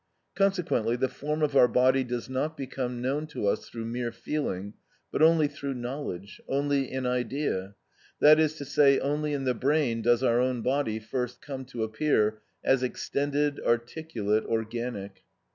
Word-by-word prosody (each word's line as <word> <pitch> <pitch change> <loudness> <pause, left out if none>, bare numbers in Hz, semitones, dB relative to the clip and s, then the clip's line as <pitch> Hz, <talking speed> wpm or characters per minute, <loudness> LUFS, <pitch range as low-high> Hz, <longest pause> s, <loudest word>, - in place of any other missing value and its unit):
Consequently 180 - +1
the 130 +2 +1
form 150 +4 -3
of 145 -2 +1
our 125 - +7
body 130 +2 +3
does 120 -1 -4
not 140 +5 -2
become 125 -2 -4
known 145 +4 -1
to 150 - -4
us 100 - 0
through 115 -1 -6
mere 120 +1 -3
feeling, 115 -5 -3 0.4
but - - -1
only 160 -1 +6
through 140 -2 -5
knowledge, 120 -7 -6
only 140 -1 0
in 130 0 -2
idea; 125 -6 -1 0.4
that 155 +1 +7
is 155 -1 +2
to 145 - -7
say, 140 0 +5
only 150 +2 -1
in 140 -2 -2
the 130 -1 +1
brain 130 -2 +1
does 120 +2 +3
our 120 -2 +3
own 125 -2 0
body 130 -4 0
first 125 +3 -4
come 135 -2 -7
to 120 -3 -4
appear 110 -2 +1 0.2
as 135 -1 +3
extended, 145 +3 -1
articulate, 120 -3 0
organic. 110 -4 -3
130 Hz, 160 wpm, -28 LUFS, 115-145 Hz, 0.4 s, our